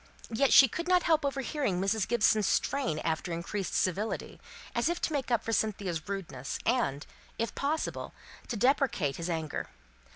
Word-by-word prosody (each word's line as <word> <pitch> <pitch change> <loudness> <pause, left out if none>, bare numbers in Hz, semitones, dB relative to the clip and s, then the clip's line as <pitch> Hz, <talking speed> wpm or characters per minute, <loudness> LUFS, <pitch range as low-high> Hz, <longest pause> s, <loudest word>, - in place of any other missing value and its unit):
Yet 265 +4 +2
she 270 - +9
could 335 +9 -4
not 360 -1 +4
help 320 -2 +3
overhearing 275 - -1
Mrs. 195 +2 +1
Gibson's 220 -3 +3
strain 270 - 0
after 165 +2 -1
increased 170 +2 -3
civility, 200 +4 -1 0.3
as - - +1
if 345 - -1
to 315 - -1
make 280 -3 -1
up 235 -2 +1
for 225 - -2
Cynthia's 195 -7 -1
rudeness, 165 -10 -4
and, 220 - +1 0.3
if 230 -2 -2
possible, 300 +3 -2 0.4
to 235 - -3
deprecate 245 - +2
his 170 +1 -4
anger. 160 -3 -3
220 Hz, 160 wpm, -30 LUFS, 180-275 Hz, 0.4 s, she